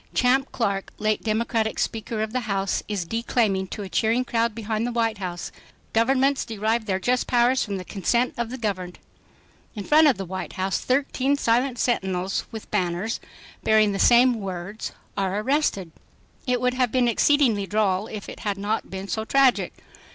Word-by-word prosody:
Champ 265 Hz, +2 st, +2 dB
Clark, 200 Hz, -5 st, -2 dB
late 215 Hz, 0 st, 0 dB
Democratic 220 Hz, 0 st, 0 dB
speaker 220 Hz, 0 st, -2 dB
of 220 Hz, +1 st, -5 dB
the 255 Hz, -, +1 dB
House, 195 Hz, -1 st, 0 dB
is 200 Hz, -5 st, -2 dB
declaiming 215 Hz, -2 st, 0 dB
to 205 Hz, -, -6 dB
a -, -, -6 dB
cheering 220 Hz, +8 st, +1 dB
crowd 230 Hz, -2 st, 0 dB
behind 220 Hz, 0 st, -2 dB
the -, -, -2 dB
White 225 Hz, -3 st, 0 dB
House, 175 Hz, -2 st, -5 dB, 0.4 s
"Governments 265 Hz, +4 st, +2 dB
derive 220 Hz, 0 st, -1 dB
their 190 Hz, -3 st, 0 dB
just 250 Hz, +6 st, 0 dB
powers 245 Hz, +1 st, +3 dB
from 200 Hz, -3 st, -3 dB
the 185 Hz, -, -7 dB
consent 235 Hz, +7 st, 0 dB
of 235 Hz, -1 st, -3 dB
the 255 Hz, -, -5 dB
governed." 190 Hz, -6 st, -3 dB, 0.8 s
In 205 Hz, -, -4 dB
front 310 Hz, +7 st, +5 dB
of 275 Hz, -, +3 dB
the 195 Hz, -, -4 dB
White 185 Hz, +1 st, -5 dB
House 190 Hz, -1 st, -1 dB
thirteen 270 Hz, +1 st, +1 dB
silent 245 Hz, 0 st, +1 dB
sentinels 190 Hz, -6 st, -1 dB
with 220 Hz, -1 st, -9 dB
banners 185 Hz, +2 st, -1 dB, 0.4 s
bearing 215 Hz, -1 st, +4 dB
the 195 Hz, -, -3 dB
same 240 Hz, +1 st, +5 dB
words, 195 Hz, +1 st, -5 dB, 0.2 s
are 195 Hz, 0 st, -1 dB
arrested. 215 Hz, -, 0 dB, 0.6 s
It 250 Hz, -1 st, +2 dB
would 250 Hz, +1 st, +1 dB
have 250 Hz, -2 st, +1 dB
been 250 Hz, -2 st, +2 dB
exceedingly 235 Hz, -5 st, +3 dB
droll 205 Hz, -1 st, +1 dB
if 210 Hz, -2 st, -7 dB
it -, -, -9 dB
had 205 Hz, -2 st, -2 dB
not 205 Hz, +3 st, -2 dB
been 190 Hz, +1 st, -6 dB
so 220 Hz, +2 st, -2 dB
tragic. 270 Hz, +2 st, +3 dB
220 Hz, 175 wpm, -24 LUFS, 195-245 Hz, 0.8 s, front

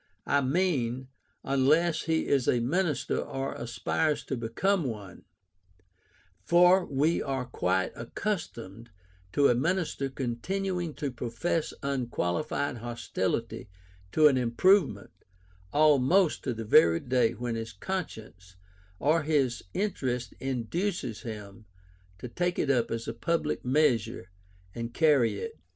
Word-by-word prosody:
I 145 Hz, -, +2 dB
mean, 130 Hz, -5 st, 0 dB, 0.3 s
unless 155 Hz, +5 st, +2 dB
he 160 Hz, -1 st, +1 dB
is 135 Hz, -3 st, +1 dB
a 120 Hz, -, +3 dB
minister 155 Hz, +5 st, 0 dB
or 135 Hz, 0 st, -4 dB
aspires 120 Hz, +6 st, -1 dB
to 135 Hz, -, -2 dB
become 155 Hz, -, 0 dB
one: 105 Hz, -6 st, -7 dB, 1.2 s
for 180 Hz, -, +5 dB
we 150 Hz, +4 st, +1 dB
are 135 Hz, -2 st, -2 dB
quite 95 Hz, -6 st, 0 dB
accustomed 115 Hz, -, -5 dB, 0.4 s
to 140 Hz, -1 st, +5 dB
a -, -, +4 dB
minister 150 Hz, 0 st, -1 dB
continuing 170 Hz, +7 st, -3 dB
to 145 Hz, -3 st, -3 dB
profess 125 Hz, +7 st, -2 dB
unqualified 130 Hz, 0 st, -1 dB
hostility 120 Hz, -4 st, -3 dB, 0.4 s
to 155 Hz, -1 st, +6 dB
an 135 Hz, -3 st, +3 dB
improvement 125 Hz, -, +2 dB, 0.6 s
almost 155 Hz, +4 st, +4 dB
to 125 Hz, -4 st, -1 dB
the 115 Hz, 0 st, -5 dB
very 85 Hz, -5 st, +5 dB
day 125 Hz, -2 st, +1 dB
when 120 Hz, +1 st, -4 dB
his 115 Hz, 0 st, -4 dB
conscience 110 Hz, -, -6 dB, 0.4 s
or 155 Hz, -, +2 dB
his 145 Hz, -5 st, +1 dB
interest 125 Hz, -, -2 dB
induces 135 Hz, -, -2 dB
him 105 Hz, -2 st, -8 dB, 0.5 s
to 95 Hz, -, -7 dB
take 175 Hz, +8 st, -1 dB
it 140 Hz, -, +1 dB
up 120 Hz, -4 st, +1 dB
as 115 Hz, 0 st, -4 dB
a 115 Hz, -, -3 dB
public 155 Hz, +5 st, -1 dB
measure, 125 Hz, -8 st, +1 dB, 0.4 s
and 115 Hz, 0 st, -6 dB
carry 145 Hz, -7 st, +3 dB
it. 455 Hz, 0 st, -6 dB
135 Hz, 120 wpm, -28 LUFS, 115-160 Hz, 1.2 s, to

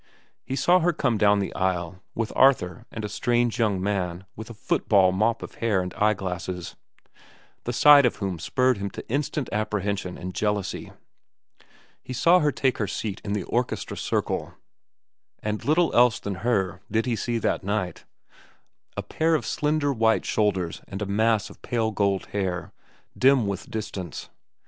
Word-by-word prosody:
He 130 Hz, -, -4 dB
saw 180 Hz, +6 st, +4 dB
her 175 Hz, 0 st, +2 dB
come 125 Hz, -7 st, 0 dB
down 105 Hz, -1 st, +5 dB
the 100 Hz, -, -2 dB
aisle, 90 Hz, -1 st, -2 dB
with 115 Hz, -1 st, -2 dB
Arthur 125 Hz, -4 st, +3 dB
and 110 Hz, -1 st, -5 dB
a -, -, -2 dB
strange 120 Hz, +3 st, 0 dB
young 105 Hz, -5 st, +2 dB
man 95 Hz, -2 st, -2 dB
with 110 Hz, +1 st, -8 dB
a -, -, -7 dB
football 100 Hz, -3 st, +3 dB
mop 110 Hz, +5 st, +1 dB
of -, -, -8 dB
hair 110 Hz, -4 st, +2 dB
and 90 Hz, 0 st, -3 dB
eyeglasses, 95 Hz, -4 st, -2 dB, 0.9 s
the 120 Hz, -, -1 dB
sight 145 Hz, +3 st, +7 dB
of 125 Hz, -, +2 dB
whom 95 Hz, -5 st, -3 dB
spurred 125 Hz, -, +1 dB
him 100 Hz, 0 st, -3 dB
to -, -, -9 dB
instant 140 Hz, +1 st, -1 dB
apprehension 100 Hz, -3 st, -2 dB
and 90 Hz, 0 st, -6 dB
jealousy. 105 Hz, -1 st, -2 dB, 1.1 s
He 130 Hz, -, -7 dB
saw 170 Hz, +8 st, +5 dB
her 150 Hz, -3 st, +2 dB
take 130 Hz, -2 st, 0 dB
her 105 Hz, -, 0 dB
seat 105 Hz, -1 st, -4 dB
in 100 Hz, -, -3 dB
the 105 Hz, -3 st, -1 dB
orchestra 120 Hz, +7 st, -2 dB
circle, -, -, -2 dB, 0.8 s
and 105 Hz, 0 st, -4 dB
little 160 Hz, +3 st, +2 dB
else 120 Hz, -1 st, +5 dB
than 100 Hz, -, -4 dB
her 100 Hz, -6 st, 0 dB
did 115 Hz, +2 st, +1 dB
he 120 Hz, -2 st, 0 dB
see 120 Hz, +1 st, -2 dB
that 110 Hz, -, -1 dB
night—a 95 Hz, -3 st, -7 dB
pair 160 Hz, +1 st, +1 dB
of 130 Hz, -8 st, -1 dB
slender 150 Hz, +1 st, 0 dB
white 110 Hz, -2 st, +2 dB
shoulders 95 Hz, -6 st, 0 dB
and 100 Hz, +1 st, -5 dB
a -, -, -2 dB
mass 110 Hz, +1 st, +1 dB
of -, -, -17 dB
pale 115 Hz, -2 st, -1 dB
gold 100 Hz, -2 st, 0 dB
hair, 95 Hz, -4 st, -2 dB, 0.4 s
dim 130 Hz, -3 st, +4 dB
with 100 Hz, -1 st, -4 dB
distance. 95 Hz, -6 st, -6 dB
105 Hz, 165 wpm, -25 LUFS, 95-120 Hz, 1.1 s, sight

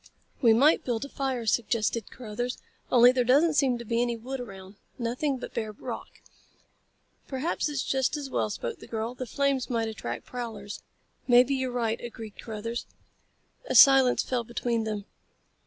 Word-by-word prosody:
"We 235 Hz, -4 st, +6 dB
might 275 Hz, +8 st, +5 dB
build 240 Hz, +1 st, -2 dB
a -, -, -9 dB
fire," 265 Hz, -4 st, -2 dB
suggested 225 Hz, 0 st, 0 dB
Carruthers, 245 Hz, +1 st, -4 dB, 0.3 s
"only 245 Hz, 0 st, +8 dB
there 255 Hz, -1 st, +1 dB
doesn't 290 Hz, +7 st, +4 dB
seem 265 Hz, -4 st, +2 dB
to 235 Hz, -, -8 dB
be 230 Hz, +1 st, 0 dB
any 240 Hz, -1 st, 0 dB
wood 260 Hz, +4 st, -6 dB
around. 195 Hz, -4 st, -9 dB, 0.2 s
Nothing 255 Hz, +4 st, -1 dB
but -, -, -8 dB
bare 215 Hz, -2 st, -3 dB
rock." -, -, -8 dB, 1.0 s
"Perhaps 290 Hz, +4 st, -1 dB
it's 285 Hz, -3 st, -2 dB
just 265 Hz, +3 st, 0 dB
as 285 Hz, -2 st, -5 dB
well," 250 Hz, -, -1 dB
spoke 205 Hz, -, -5 dB
the -, -, -12 dB
girl. 225 Hz, +1 st, -3 dB
"The 255 Hz, 0 st, -6 dB
flames 275 Hz, 0 st, 0 dB
might 230 Hz, -2 st, 0 dB
attract 120 Hz, -, -6 dB
prowlers." 220 Hz, -5 st, -6 dB, 0.5 s
"Maybe 250 Hz, +2 st, +6 dB
you're 260 Hz, -1 st, -1 dB
right," 230 Hz, -2 st, -1 dB
agreed 225 Hz, -3 st, -8 dB
Carruthers. 230 Hz, +1 st, -5 dB, 0.8 s
A -, -, 0 dB
silence 270 Hz, -3 st, +7 dB
fell 250 Hz, -2 st, -1 dB
between 235 Hz, -1 st, -2 dB
them. 210 Hz, -2 st, -3 dB
240 Hz, 165 wpm, -28 LUFS, 225-260 Hz, 1.0 s, only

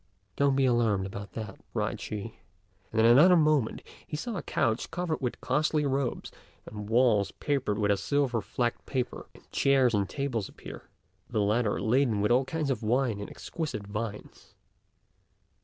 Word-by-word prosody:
"Don't 140 Hz, -1 st, +3 dB
be 135 Hz, 0 st, +3 dB
alarmed 115 Hz, -6 st, +2 dB
about 100 Hz, +1 st, -7 dB
that," 110 Hz, -2 st, -6 dB
cried -, -, -2 dB
she; 110 Hz, +1 st, -6 dB, 0.5 s
and 110 Hz, -, -1 dB
in -, -, +5 dB
another 145 Hz, +11 st, +7 dB
moment 150 Hz, -7 st, +2 dB, 0.2 s
he 150 Hz, -, -4 dB
saw 235 Hz, +7 st, -4 dB
a 180 Hz, -, -3 dB
couch 115 Hz, 0 st, -1 dB
covered 175 Hz, -4 st, -2 dB
with 125 Hz, -2 st, -2 dB
costly 150 Hz, +3 st, +1 dB
robes, 135 Hz, -1 st, -1 dB, 0.3 s
the -, -, -10 dB
walls 105 Hz, -1 st, +2 dB
papered 135 Hz, -8 st, -1 dB
with 105 Hz, -1 st, +2 dB
a 100 Hz, -, +2 dB
silver 125 Hz, +2 st, 0 dB
flecked 120 Hz, 0 st, -2 dB
paper, 125 Hz, -2 st, -3 dB
and -, -, -18 dB
chairs 135 Hz, -3 st, +3 dB
and 100 Hz, -3 st, +1 dB
tables 130 Hz, -8 st, -2 dB
appear, -, -, -11 dB, 0.4 s
the -, -, -1 dB
latter 105 Hz, -2 st, +1 dB
laden 110 Hz, +2 st, +2 dB
with 105 Hz, +3 st, +1 dB
all 130 Hz, +2 st, +4 dB
kinds 150 Hz, 0 st, -2 dB
of 125 Hz, -, -2 dB
wine 115 Hz, -1 st, +1 dB
and 100 Hz, -, -6 dB
exquisite 155 Hz, -11 st, -5 dB
viands. 105 Hz, +1 st, -7 dB
120 Hz, 165 wpm, -29 LUFS, 105-140 Hz, 0.5 s, another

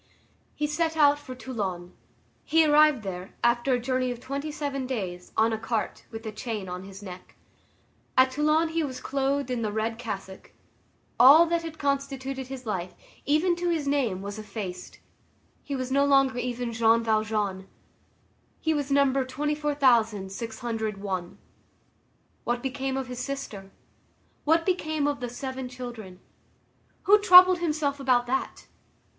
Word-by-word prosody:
He 300 Hz, -, -1 dB
set 320 Hz, +2 st, -1 dB
out 290 Hz, -1 st, +5 dB
for 255 Hz, -3 st, -9 dB
Toulon. 195 Hz, -9 st, -5 dB, 0.5 s
He 320 Hz, +1 st, +4 dB
arrived 300 Hz, -4 st, +5 dB
there, 185 Hz, -1 st, -7 dB
after 240 Hz, +2 st, +2 dB
a 250 Hz, -, +2 dB
journey 255 Hz, +1 st, -1 dB
of 245 Hz, -1 st, -5 dB
twenty 280 Hz, +4 st, -4 dB
seven 280 Hz, -3 st, -3 dB
days, 185 Hz, -8 st, -5 dB
on 225 Hz, +1 st, +3 dB
a 220 Hz, -, -2 dB
cart, 225 Hz, -1 st, -3 dB
with 225 Hz, 0 st, -8 dB
a 220 Hz, -, -4 dB
chain 215 Hz, -3 st, -5 dB
on 180 Hz, +1 st, -6 dB
his 195 Hz, +1 st, -11 dB
neck. 185 Hz, -2 st, -10 dB, 0.8 s
At 260 Hz, 0 st, +5 dB
Toulon 305 Hz, +4 st, +2 dB
he 325 Hz, 0 st, -1 dB
was 260 Hz, -3 st, -5 dB
clothed 275 Hz, -1 st, -1 dB
in 245 Hz, -2 st, -1 dB
the 215 Hz, -2 st, -1 dB
red 225 Hz, +2 st, -2 dB
cassock. 195 Hz, -5 st, -7 dB, 0.7 s
All 285 Hz, +7 st, +9 dB
that 340 Hz, 0 st, 0 dB
had 325 Hz, -1 st, -8 dB
constituted 275 Hz, -2 st, -2 dB
his 260 Hz, -1 st, -8 dB
life, 185 Hz, -4 st, -4 dB, 0.3 s
even 320 Hz, +5 st, +3 dB
to 350 Hz, 0 st, -1 dB
his 315 Hz, -4 st, -1 dB
name, 240 Hz, -10 st, 0 dB
was 200 Hz, +2 st, -6 dB
effaced; 200 Hz, -4 st, -7 dB, 0.6 s
he 280 Hz, -, -5 dB
was 255 Hz, -1 st, -4 dB
no 280 Hz, +1 st, +3 dB
longer 275 Hz, -2 st, +3 dB
even 245 Hz, -1 st, -3 dB
Jean 225 Hz, 0 st, +3 dB
Valjean; 215 Hz, -3 st, -1 dB, 0.9 s
he 320 Hz, -, 0 dB
was 290 Hz, -2 st, -2 dB
number 275 Hz, -1 st, +3 dB
24,601. 225 Hz, -, -1 dB, 1.1 s
What 240 Hz, 0 st, -2 dB
became 265 Hz, 0 st, -2 dB
of 265 Hz, -, -2 dB
his 250 Hz, -1 st, -7 dB
sister? 250 Hz, -8 st, -6 dB, 0.8 s
What 325 Hz, +2 st, +3 dB
became 315 Hz, -5 st, 0 dB
of 290 Hz, -1 st, -1 dB
the 245 Hz, -1 st, -4 dB
seven 260 Hz, +1 st, -6 dB
children? 240 Hz, -7 st, -9 dB, 0.8 s
Who 415 Hz, +2 st, +6 dB
troubled 370 Hz, -2 st, +8 dB
himself 300 Hz, -4 st, -1 dB
about 250 Hz, -3 st, +2 dB
that? 265 Hz, +2 st, -3 dB
255 Hz, 150 wpm, -26 LUFS, 220-285 Hz, 1.1 s, All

